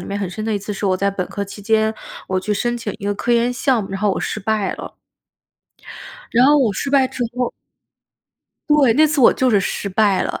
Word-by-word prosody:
里 - - -8
面 200 - -4
很 195 - -3
深 215 +4 -6
的 220 - -1
一 205 - 0
次 205 +1 -6
是 205 - -5
我 190 -1 +2
在 200 +2 0
本 195 -2 -2
科 200 - -4
期 200 +1 -11
间， 220 +1 +1 0.3
我 185 0 -1
去 210 - -2
申 240 +4 -1
请 230 -4 -5
一 200 - -9
个 205 0 0
科 235 +4 -3
研 235 +1 +2
项 255 -1 +1
目， 195 - -8
然 195 - -4
后 210 -1 +2
我 - - -2
失 215 - -3
败 210 0 -1
了。 - - -9 1.4
然 245 +3 +4
后 295 +1 +5
我 240 -7 +2
失 275 +8 -3
败 270 -2 +4
之 250 - -5
后 250 -1 -1 1.2
对， 285 -6 +5
那 310 +2 +5
次 295 -1 0
我 240 - +7
就 260 -1 +1
是 205 -3 +3
失 195 +1 -3
败 200 0 +2
了。 - - -4
215 Hz, 265 characters per minute, -19 LUFS, 200-245 Hz, 1.4 s, 我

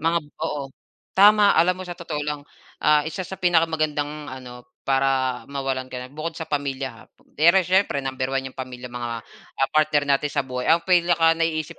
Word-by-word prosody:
Mga 165 +2 +2 0.2
oo. 150 -3 -2 0.5
Tama, 205 +1 +6
alam 180 +3 +3
mo 185 - -7
sa 175 - -6
totoo 165 -3 -5
lang, 150 -1 -3 0.4
ah, 150 0 +4
isa 160 +4 -4
sa 190 +1 -8
pinakamagandang 155 -4 0
ano, 125 -2 -10 0.2
para 135 -2 0
mawalan 135 -2 -3
ka 130 - -8
na 125 - -9
bukod 155 +3 -5
sa 160 - -6
pamilya 140 -3 -2
ha, 115 -1 -15 0.4
pero 170 +5 +6
siyempre 185 -5 +1
number 130 -1 -2
1 135 0 -2
'yong - - -25
pamilya, 125 -1 -7
mga, 120 -1 -5
ah, 135 +4 -4
partner 155 -1 +3
natin 140 +1 +2
sa - - +2
buhay. 125 -1 -5
Ang 165 +1 +4
pinakanaiisip 165 -3 +2
150 Hz, 180 wpm, -23 LUFS, 130-165 Hz, 0.5 s, Tama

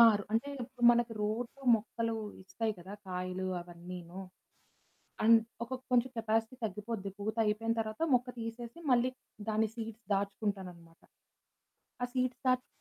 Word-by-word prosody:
ఆ! - - +12 0.3
అంటే 230 +6 +2
ఇప్పుడు 245 0 -3
మనకు 240 -1 +3
రోజు 230 +5 -1 0.2
మొక్కలు 230 +1 -1 0.3
ఇస్తాయి 215 +4 -1
కదా, 185 +3 -9 0.2
కాయలు 185 +1 -2
అవన్నీను. 175 +1 -8 1.0
అండ్ 230 0 +9 0.2
ఒక 250 - -11 0.2
కొంచెం 250 +1 +4
కెపాసిటీ 225 +1 +1
తగ్గిపోద్ది. 210 0 -3
పూత 210 +2 -2
అయిపోయిన 225 +2 +1
తర్వాత 215 +5 -3
మొక్క 250 +1 +3
తీసేసి 230 +5 -5
మళ్ళీ 250 +1 +5 0.4
దాని 220 +1 +3
సీడ్స్ 225 -1 -6
దాచుకుంటానన్నమాట. 195 -4 -3 1.0
ఆ - - +4
సీడ్స్ 255 -1 +1
దాచుకున్నక 255 0 +3
220 Hz, 125 wpm, -33 LUFS, 195-235 Hz, 1.0 s, ఆ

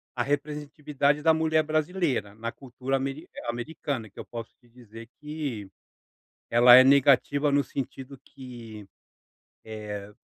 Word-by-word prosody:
a 120 - 0
representatividade 145 0 -1
da 160 +1 +5
mulher 160 0 +2
brasileira 155 - -1
na 115 +1 -5
cultura 130 +1 -4
ameri 135 +4 -5 0.2
americana, 120 -1 -4
que - - -15
eu - - -7
posso 115 -1 -8
te 120 - -26
dizer 115 -1 -13
que 145 -10 -5 0.8
ela 120 +1 +8
é 130 - +9
negativa 140 +1 +4
no 140 0 +3
sentido 135 0 -6
que, 115 -6 -11 0.8
eh, 105 -2 -7
135 Hz, 130 wpm, -26 LUFS, 115-150 Hz, 0.8 s, é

